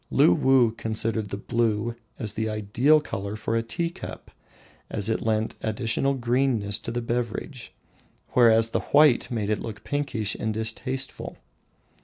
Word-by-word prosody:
Luwuh 120 +5 +4
considered 110 -1 -1
the 100 - -4
blue 115 +1 0 0.2
as 105 -2 -2
the 110 0 -2
ideal 110 +8 +3
colour 100 -6 -5
for 110 +1 -2
the 115 - +2
tea 170 +9 -1
cup, - - -9 0.6
as 105 -1 0
it 110 - 0
lent 110 0 0
additional 115 +5 0
greenness 120 -4 +1
to - - -7
the 120 +1 -3
beverage, 120 +2 -4 0.6
whereas 115 -2 +5
the - - +1
white 145 -4 +4
made 110 -3 -2
it 105 - 0
look 105 -2 -7
pinkish 130 -8 -2
and 110 -1 -3
distasteful. 130 +4 -3
115 Hz, 145 wpm, -25 LUFS, 110-125 Hz, 0.6 s, whereas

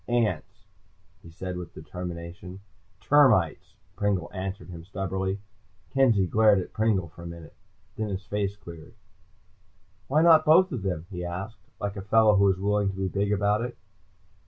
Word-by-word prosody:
"Ants," 115 -9 -1 0.6
he - - -13
said 90 +2 -6
with 90 -2 -8
determination. 90 +1 -8 0.4
"Termites," 130 - +3 0.2
Pringle 100 -4 -1
answered 95 +1 -5
him 85 -1 -9
stubbornly. 95 +1 -3 0.5
Kenzie 120 -8 +3
glared 105 +2 +4
at 95 - -4
Pringle 105 -6 +1
for 85 +2 -14
a 85 - -7
minute, 85 -2 -10 0.4
then 110 -1 -2
his 100 0 -5
face 100 -1 -2
cleared. 85 +1 -12 1.1
"Why 150 +4 +3
not 160 -2 +7
both 175 +5 +5
of 125 - -3
them?" 90 -4 -3
he 90 -2 -5
asked, 90 +3 -6
like 100 0 -4
a - - -4
fellow 105 +2 +4
who 100 0 +4
was 95 -1 +2
willing 100 0 +1
to 95 - -5
be 95 0 -2
big 100 +2 -1
about 105 +1 +2
it. 120 +1 -5
100 Hz, 160 wpm, -26 LUFS, 90-105 Hz, 1.1 s, not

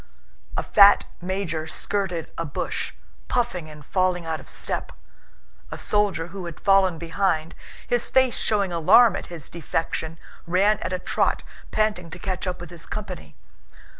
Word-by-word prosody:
A - - 0
fat 200 0 +7 0.2
major 175 -4 -2
skirted 180 -1 -2
a 165 - -2
bush, 145 -5 -3 0.4
puffing 185 -10 -1
and 150 -2 -12
falling 185 -1 +1
out 160 -1 -2
of - - -13
step; - - -3 0.8
a - - -6
soldier 200 -5 0
who 185 +1 -7
had 170 - -8
fallen 195 -3 +4
behind, 165 -1 0 0.3
his 240 -1 +1
face 260 -2 +3
showing 200 -4 +1
alarm 195 +8 +6
at - - -5
his 170 -5 -6
defection, 165 0 -3 0.3
ran 195 +5 +3
at - - -3
a 185 - 0
trot, 180 - 0 0.3
panting 210 -5 0
to 180 - -8
catch 185 +1 -3
up 180 0 -2
with 175 -1 -9
his 170 -2 -6
company. 215 -1 -6
180 Hz, 155 wpm, -24 LUFS, 165-200 Hz, 0.8 s, fat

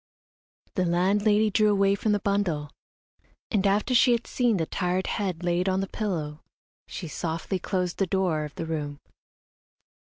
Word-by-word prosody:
The 185 - +1
landlady 205 +5 +3
drew 215 +1 +4
away 200 -1 +3
from 210 +2 0
the 205 - +2
bundle, 185 -8 -1 0.8
and 205 -3 +2
after 205 +5 +1
she 245 +1 +6
had 235 0 -1
seen 240 -4 +1
the 165 - 0
tired 180 +2 -1
head 185 -5 -2
laid 175 +2 +1
on 190 0 +1
the 195 - -2
pillow, 160 -9 -3 0.5
she 175 - -6
softly 165 +4 -3
closed 180 -1 -2
the 195 - +2
door 180 -5 0
of 150 - -8
the 165 - -4
room. 150 -3 -3
190 Hz, 160 wpm, -26 LUFS, 170-205 Hz, 0.8 s, she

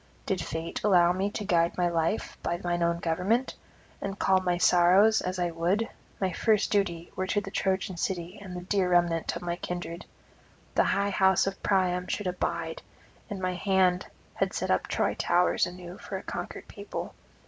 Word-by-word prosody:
Did 190 -2 -1
fate 165 +2 -4
allow 175 -4 +5
me 190 +2 0
to 205 0 -5
guide 170 -3 +2
my 180 -1 +2
life 170 +4 -1
by 170 - -1
mine 175 0 -1
own 170 0 +2
government, 180 +10 0 0.5
and 195 0 -4
calm 190 -1 +3
my 180 -1 +1
sorrows 180 +5 +5
as 185 +1 -3
I 175 -1 0
would, 180 +7 0 0.3
my 190 -2 0
first 215 +3 +2
duty 175 -5 0
were 185 - -2
to 205 - +1
the 195 -1 -7
Trojan 190 -2 -1
city 180 +1 -3
and 185 -3 -8
the 180 - -5
dear 185 0 +1
remnant 175 -2 +2
of 170 - -6
my 175 0 -2
kindred; 175 -1 -5 0.7
the - - +3
high 200 0 +1
house 190 -1 +4
of 195 0 -4
Priam 180 -2 +1
should 205 - -2
abide, 165 -2 -2 0.5
and 205 - -4
my 185 -1 -1
hand 185 -1 +2 0.3
had - - -1
set - - -1
up - - +1
Troy - - 0
towers 175 +1 +2
anew 180 0 -9
for - - -5
a - - -8
conquered - - -6
people. - - -6
180 Hz, 185 wpm, -28 LUFS, 175-195 Hz, 0.7 s, allow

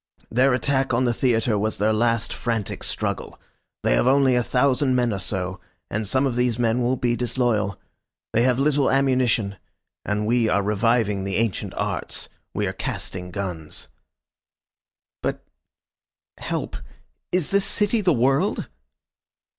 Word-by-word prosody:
Their 125 +2 +4
attack 130 -1 +1
on 125 - +2
the 120 -1 +2
theatre 115 -3 +1
was 110 +2 -1
their 110 +2 +2
last 115 +1 +1
frantic 115 -4 -2
struggle. - - -3 0.4
They - - +3
have - - +2
only 135 -1 +4
a 125 - +3
thousand 130 +2 +2
men 120 -3 +2
or 100 - -3
so, 95 0 -2 0.3
and 105 0 -2
some 130 +6 +2
of 130 -3 0
these 125 -2 +1
men 120 0 +1
will 125 +2 +2
be 120 -1 0
disloyal. 120 -5 0 0.5
They 115 - +3
have 125 0 +3
little 140 0 +2
ammunition. 125 -7 +2 0.5
And 105 +1 -1
we 115 0 +2
are 100 - +2
reviving 105 -1 +1
the 95 -1 -3
ancient 110 -2 -1
arts. - - -3 0.2
We - - -1
are - - -2
casting 90 -1 -4
guns." 90 -6 -5 1.3
"But - - -2 1.0
help. - - -3 0.5
Is 180 -2 0
this 200 0 +3
city 210 +3 +1
the 185 -3 +3
world?" 135 - +1
120 Hz, 145 wpm, -23 LUFS, 105-130 Hz, 1.3 s, Their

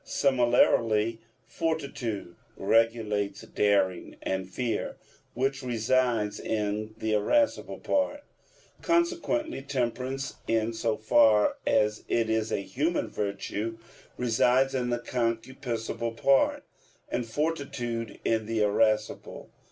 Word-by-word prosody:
Similarly, 120 - +3 0.3
fortitude 120 - -3 0.2
regulates 115 -3 +1
daring 100 -3 +1
and 95 -1 -2
fear, 115 +4 -2 0.4
which 135 +2 0
reside 120 -3 +1
in 105 0 -2
the 110 -1 -1
irascible 285 - +1
part. 290 0 0 0.6
Consequently 335 - 0
temperance, 135 0 -3
in 115 0 +1
so 110 -1 -1
far 110 -1 +4
as 105 0 +2
it 115 -1 +1
is 110 0 0
a 100 - -1
human 145 - -1
virtue, 105 +2 -3 0.4
resides 125 +2 +3
in 125 -2 -1
the 120 - +1
concupiscible 115 -1 -3
part, 135 +2 +3 0.4
and 125 - -2
fortitude 120 -5 -3
in 110 -1 +1
the 110 -1 +1
irascible. 105 +1 0
115 Hz, 100 wpm, -28 LUFS, 110-130 Hz, 0.6 s, far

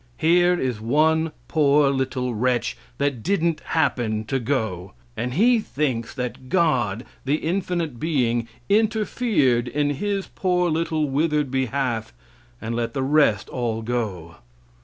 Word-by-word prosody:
Here 175 +2 +3
is 125 -5 -2
one 160 +6 +2 0.2
poor 145 -2 +3
little 130 -2 -1
wretch 120 +2 0 0.2
that 140 -4 -1
didn't 170 - +1
happen 115 -9 0
to 135 +4 -1
go! 110 -8 -2 0.2
And 125 +2 -3
he 235 +6 +4
thinks 135 - -2
that 125 +1 -5
God, 125 - +1 0.2
the 140 +2 +1
infinite 170 -5 -2
being, 120 -7 0 0.2
interfered 210 - +2
in 145 +2 0
his 195 +6 -2
poor 180 -2 0
little 160 -1 0
withered 150 0 0
behalf 130 - -1 0.5
and 115 +1 -4
let 120 +3 -2
the 135 - 0
rest 135 -7 +3
all 115 -3 -2
go. 105 -9 -3
135 Hz, 130 wpm, -23 LUFS, 120-160 Hz, 0.5 s, he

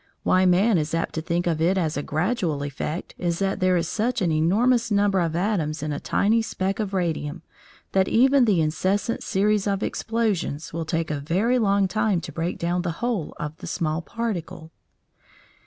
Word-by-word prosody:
Why 185 0 +3
man 185 +2 +4
is 155 +2 -2
apt 165 - -2
to 160 - -2
think 170 +2 -1
of 165 -2 0
it 180 +4 +3
as 160 -4 0
a 145 - -1
gradual 160 -1 -1
effect 145 +4 -4
is 170 -1 -1
that 195 +1 -1
there 185 -1 +3
is 165 -1 -1
such 235 +6 -1
an 180 -5 +1
enormous 225 +10 +2
number 200 -2 +2
of 165 -2 0
atoms 170 -6 -1
in 150 -1 -2
a 145 - -3
tiny 225 +3 +2
speck 195 -3 -2
of 210 -3 -2
radium, 165 -2 -2 0.5
that 190 -1 +2
even 260 +2 +4
the 195 -7 +3
incessant 190 +8 0
series 205 +1 +1
of 200 0 0
explosions 210 -11 -2
will 165 0 -3
take 165 0 -1
a 150 - -2
very 195 - +1
long 200 -3 +2
time 215 -1 +1
to - - -7
break 170 +2 -3
down 175 +1 -1
the 175 -2 -2
whole 235 -10 -2
of 150 +1 -4
the - - -9
small 155 0 -1
particle. 180 -6 -5
180 Hz, 190 wpm, -24 LUFS, 165-210 Hz, 0.5 s, man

